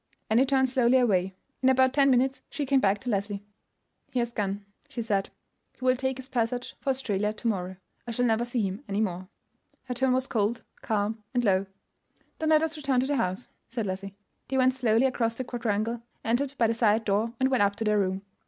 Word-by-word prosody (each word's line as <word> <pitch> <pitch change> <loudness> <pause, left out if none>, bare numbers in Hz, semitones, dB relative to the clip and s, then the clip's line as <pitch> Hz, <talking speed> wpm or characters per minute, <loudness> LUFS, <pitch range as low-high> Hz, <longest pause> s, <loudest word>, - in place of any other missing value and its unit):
Annie 245 +5 +4
turned 265 -1 +3
slowly 255 0 +3
away. 190 -6 +2 0.3
In 260 - +4
about 260 0 +4
ten 275 -1 +4
minutes 265 +1 +2
she 290 - -3
came 270 0 +3
back 200 -3 +2
to 255 - -4
Leslie. 200 0 -2 0.7
"He 260 - -3
has 235 -1 0
gone," 200 -1 -2 0.2
she 235 - -4
said. 200 -3 0 0.5
"He 255 - -6
will 255 0 +5
take 265 0 -2
his 260 -1 -8
passage 245 -1 -2
for - - -3
Australia 210 -6 0
to 225 +2 -4
morrow. 190 -4 -1 0.3
I - - -4
shall 245 +2 0
never 225 0 +2
see 240 -1 -1
him 195 +6 -3
any 200 +1 -1
more." 185 -3 -2 0.6
Her 255 - -4
tone 255 +1 +2
was 260 0 +1
cold, 230 -1 -1 0.2
calm, 215 0 -1
and 245 - +2
low. 195 -1 +2 0.7
"Then 315 - 0
let 310 0 +5
us 320 0 -2
return 275 -4 +1
to - - 0
the 285 +1 0
house," 185 +2 -1 0.2
said 230 -2 -3
Leslie. 195 +1 -5 0.3
They 265 - -1
went 255 0 +4
slowly 240 -1 +2
across 230 -3 0
the 255 - -3
quadrangle, 230 -1 -2 0.2
entered 260 +5 0
by 235 - +3
the 225 - +2
side 225 -1 +2
door, 215 +3 +1
and 260 +1 +2
went 255 - +3
up 200 0 +3
to 225 - -3
their 210 -1 +2
room. 190 0 -1
235 Hz, 220 wpm, -27 LUFS, 205-260 Hz, 0.7 s, will